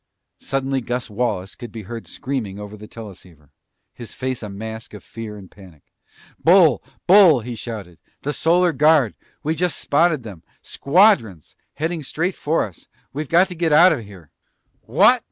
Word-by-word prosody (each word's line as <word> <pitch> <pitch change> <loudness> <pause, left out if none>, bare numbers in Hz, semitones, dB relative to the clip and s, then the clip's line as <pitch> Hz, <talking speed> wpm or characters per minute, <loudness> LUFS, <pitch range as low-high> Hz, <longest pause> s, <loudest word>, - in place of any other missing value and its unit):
Suddenly 135 0 -2
Gus 120 -1 -4
Wallace 100 -4 -2
could 120 -3 -10
be 110 -1 -8
heard 115 +4 -8
screaming 120 -8 -5
over 105 0 -8
the 105 0 -12
teleceiver, 90 -10 -13 0.4
his 120 -3 -10
face 130 -1 -3
a 105 - -6
mask 110 +2 -8
of 105 - -11
fear 110 -2 -8
and 95 -3 -13
panic. 90 -8 -17 0.6
"Bull! 165 -6 +5 0.2
Bull!" 180 -8 +7
he 120 +2 -6
shouted. 105 -7 -8 0.2
"The 145 - -2
Solar 175 +2 +3
Guard! 150 -7 +3 0.3
We 155 - 0
just 175 -1 -1
spotted 155 -2 +1
them! 100 -7 -10 0.2
Squadrons! 140 - +2 0.2
Heading 160 +2 -2
straight 170 +6 -2
for 155 +3 0
us! 95 -6 -10 0.3
We've 150 +1 -5
got 175 +3 +4
to - - -5
get 165 -1 0
out 170 +4 +7
of 125 -7 -5
here!" 95 -7 -15 0.5
"What?" - - +4
120 Hz, 165 wpm, -21 LUFS, 105-160 Hz, 0.6 s, Bull